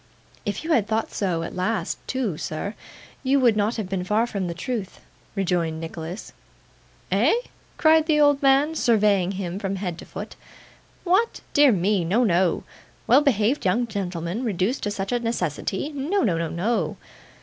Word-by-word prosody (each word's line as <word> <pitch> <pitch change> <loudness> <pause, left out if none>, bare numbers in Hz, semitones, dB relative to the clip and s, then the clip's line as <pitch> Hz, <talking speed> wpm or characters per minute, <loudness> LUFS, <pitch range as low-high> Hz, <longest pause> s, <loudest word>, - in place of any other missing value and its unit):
'If 205 - -2
you 330 - -2
had 225 -9 +3
thought 220 0 -1
so 175 -5 -1
at - - -6
last, 210 +5 -1
too, 250 -10 -1
sir, 155 +7 -4 0.5
you 275 +1 +2
would 240 -4 +4
not 210 +2 +1
have 215 -5 -3
been 190 -1 -2
far 210 +5 +2
from 200 -6 -3
the 170 - -4
truth,' 205 +1 -4 0.4
rejoined 175 -5 0
Nicholas. 165 +4 -7 0.8
'Eh?' - - +4 0.4
cried 315 -1 +4
the 305 -2 +3
old 290 -1 +4
man, 275 +3 +4
surveying 205 - +2
him 185 -1 -4
from 195 -1 -2
head 180 -3 -4
to - - -9
foot. - - -8 0.7
'What! 390 +6 +1
Dear 290 -2 +6
me! 195 -1 +1
No, 200 +9 +2
no. 180 -4 +2 0.4
Well 260 +5 +6
behaved 255 -1 +2
young 205 +7 +2
gentleman 185 -1 -3
reduced 210 +3 0
to 205 - -1
such 195 0 -3
a 245 - +1
necessity! 210 - -2
No 295 +9 0
no, 190 -8 +2
no 165 -1 -2
no. 180 -2 -1
205 Hz, 170 wpm, -24 LUFS, 180-250 Hz, 0.8 s, Dear